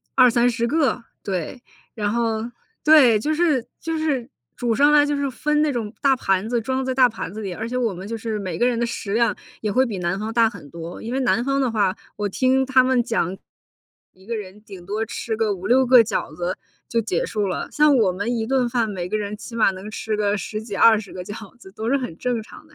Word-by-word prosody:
20-30 240 -2 +4
个， 275 -3 +1 0.2
对。 195 +6 -4 0.3
然 210 -3 -1
后 225 -2 0 0.4
对， 275 -8 +6
就 305 +8 -1
是 305 -7 +2 0.2
就 325 0 -3
是 285 -6 -1 0.3
煮 240 -2 0
上 285 +6 +4
来 295 -1 +6
就 290 0 0
是 280 -1 -1
分 300 +4 0
那 305 - +2
种 230 -4 -4
大 275 -2 +4
盘 195 -3 0
子 240 -1 +1
装 260 +3 -2
在 260 0 -2
大 255 -2 +6
盘 220 -7 -6
子 215 - -7
里， 195 -3 -4
而 220 +5 -5
且 250 - -2
我 230 -5 0
们 185 +3 -8
就 230 - -4
是 220 -1 -3
每 190 -2 -4
个 240 - +2
人 240 -2 0
的 - - +1
食 200 -3 -4
量 230 -1 +2 0.3
也 215 - -1
会 255 +5 +3
比 210 -6 -4
南 175 +2 -1
方 220 +2 -4
大 230 -1 +4
很 180 - -12
多。 170 +1 -8
因 230 +2 -4
为 265 - 0
南 245 -2 +1
方 275 0 +1
的 260 - +1
话， 205 -4 +1 0.2
我 205 -1 -2
听 260 +5 +2
他 260 -1 +4
们 255 -1 +2
讲， 195 -6 -1 0.8
一 190 +1 -21
个 230 0 -3
人 200 0 -8
顶 195 -4 -11
多 215 +4 -2
吃 225 0 -4
个 215 -2 +1
5-6 245 +8 +2
个 250 0 +8
饺 200 -7 -3
子 175 +2 -3 0.3
就 230 - +1
结 205 -6 -1
束 210 -2 -1
了。 185 - -3
像 300 -2 +4
我 215 -6 +3
们 205 +6 -2
一 225 - -1
顿 255 -1 +1
饭， 235 -2 0
每 180 -3 -4
个 215 - -1
人 210 0 -4
起 225 +2 -10
码 225 -4 +4
能 190 +2 -8
吃 215 0 -3
个 205 -1 +1
10 210 +2 -4
几 220 -2 -7
20 220 0 +4
个 180 - -6
饺 205 +4 -9
子 190 - -14
都 220 +3 -4
是 275 - +3
很 250 -12 -5
正 245 -3 -1
常 250 - -14
的， 310 - -22
230 Hz, 250 characters per minute, -22 LUFS, 205-255 Hz, 0.8 s, 个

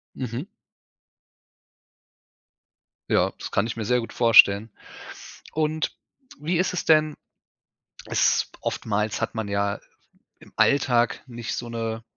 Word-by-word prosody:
Mhm. 125 +3 -4 2.6
Ja, - - +2
das - - -7
kann 100 +3 +1
ich 115 - -5
mir 110 - -3
sehr 125 +3 +2
gut 115 - -7
vorstellen. 110 -2 +6 0.8
Und 155 0 -1 0.4
wie 165 +4 -1
ist 185 - 0
es 180 - -3
denn? 155 -1 +4 0.9
S - - +1
oftmals 105 0 -2
hat - - -3
man 110 -2 -3
ja 100 0 -1 0.6
im - - -18
Alltag 120 -4 +2
nicht 120 -2 -5
so 120 - -6
'ne 115 -1 -4
115 Hz, 120 wpm, -24 LUFS, 110-140 Hz, 2.6 s, vorstellen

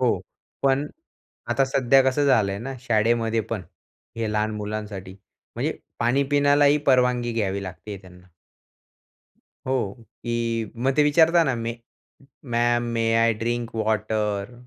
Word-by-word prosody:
हो, 120 -7 +2 0.4
पण 135 +2 +2 0.6
आता 135 - +3
सध्या 135 0 +3
कसं 135 +2 +2
झालंय 105 -7 +2
ना, 135 +5 -6
शाळेमध्ये 115 -1 +1
पण, 110 -5 -2 0.5
हे 110 -2 -2
लहान 105 0 0
मुलांसाठी? 105 -3 -6 0.4
म्हणजे - - -2 0.2
पाणी 120 +4 +2
पिण्यालाही 145 0 +4
परवानगी 125 -2 +3
घ्यावी 100 -3 -1
लागते 95 +3 -7
त्यांना. 90 -1 -16 1.4
हो. 120 -7 0 0.3
की 115 -2 -2
मग 130 +3 0
ते 150 - +5
विचारता 165 +3 +5
ना, 135 - 0
"मे 115 0 -4 0.7
ma'am, 120 0 +2
may 115 0 0
I 115 0 +4
drink 120 +1 -2
water?" 110 -1 -1
115 Hz, 125 wpm, -24 LUFS, 105-130 Hz, 1.4 s, ते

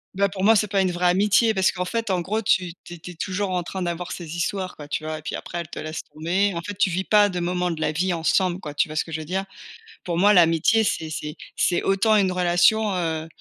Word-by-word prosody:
Bah 200 0 +2
pour 190 0 -5
moi, 225 +2 +6
c'est 210 +1 +2
pas 195 -1 +1
une 185 -1 +1
vraie 175 +1 0
amitié 210 +4 +3
parce 190 -1 +3
qu'en 180 -1 -3
fait, 225 0 -2
en 180 -2 +1
gros, 215 +5 -2
tu 180 -3 +1
tu 175 - -10
es - - -9
tu 180 - -9
es - - -10
toujours 195 +3 -2
en 180 -1 -1
train 190 +2 -6
d'avoir 175 0 -3
ces 170 -2 -6
histoires, 185 +1 -2
quoi, 145 -1 -10
tu 155 - -3
vois? 155 0 -3
Et - - -10
puis - - -5
après, 175 - -6
elle 170 - -5
te - - -7
laisse 155 +1 -5
tomber. 180 +6 -1
En 170 - -4
fait, 205 +3 -6
tu 195 -3 +2
vis 185 +2 -1
pas 205 0 +4
de 180 -1 -3
moments 180 0 -1
de 160 -1 -5
la - - +1
vie 180 +3 0
ensemble, 175 +2 +1
quoi, 150 -4 -8
tu - - +2
vois 155 - -8
ce - - +1
que 165 - -12
je 160 0 -3
veux - - -8
dire? 190 +4 -2 0.6
Pour 170 -2 -2
moi, 205 +3 +5
l'amitié, 175 +5 +4
c'est 160 -4 -2
c'est 150 0 -5 0.2
c'est 175 - +1
autant 205 +3 +3
une 195 -3 +3
relation, 180 +4 +2
heu, 160 -2 -2
180 Hz, 280 wpm, -23 LUFS, 170-195 Hz, 0.6 s, moi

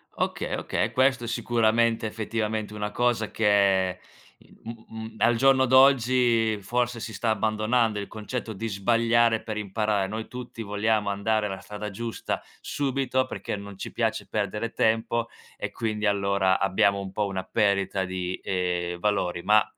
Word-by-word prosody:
Okay, - - -2
okay, - - -1
e - - -5
questo 130 -2 +2
sicuramente, 115 0 +1
effettivamente 110 0 -3
è - - -7
una 105 0 -2
cosa 120 -2 +1
che, 100 -3 +2 0.6
mhmm, 115 0 -9
mhmm, 110 0 -8
al 120 - +4
giorno 135 +2 +4
d'oggi 125 -4 +4
forse 120 +4 -1
si 110 0 -6
sta 110 +4 -1
abbandonando 110 0 +1
il 100 - -5
concetto 110 +1 -5
di 115 +3 -4
sbagliare 115 +2 +2
per 110 -2 -4
imparare. 105 -1 0
Noi 110 +2 -5
tutti 125 -2 -7
vogliamo 105 +1 0
andare 105 +2 0
a - - -2
la 95 - -5
strada 105 0 -7
giusta 115 +3 -4 0.2
subito, 135 -2 -1
perché - - -4
non 100 -1 -9
ci - - -6
piace 110 -3 -1
perdere 105 +2 -2
tempo 115 +1 +1 0.3
e - - -5
quindi 110 -2 -2
allora 100 -2 +2
abbiamo 100 +1 +2
un 95 -1 -6
po' 105 +1 -1
una 95 -1 -3
perdita 100 -2 +1
di, 90 -1 -4
ehm, 90 -2 -1
valori. 90 -3 0
Ma 105 0 +5
110 Hz, 160 wpm, -26 LUFS, 100-115 Hz, 0.6 s, Ma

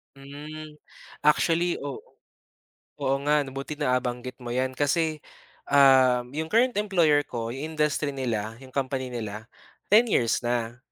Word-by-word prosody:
Hmm, 150 +2 -10 0.5
actually, 170 +2 +3
oo. 140 -2 -5 1.0
Oo 135 0 +1
nga 150 0 +3
buti 135 +3 -6
nabanggit 125 -2 -1
mo 120 0 -5
'yan 130 +1 -1
kasi, 155 +2 +1 0.5
ah, 130 -3 +6
'yong 160 +3 -4
current 245 +1 +3
employer 170 -8 +3
ko 115 -1 -4
'yong 145 +6 -5
industry 150 -1 0
nila, 115 -5 -2
'yong 130 - -12
company 130 -1 -2
nila 110 0 -6 0.4
10 220 +4 +6
years 115 - +2
na. 120 0 -1
140 Hz, 130 wpm, -26 LUFS, 125-155 Hz, 1.0 s, ah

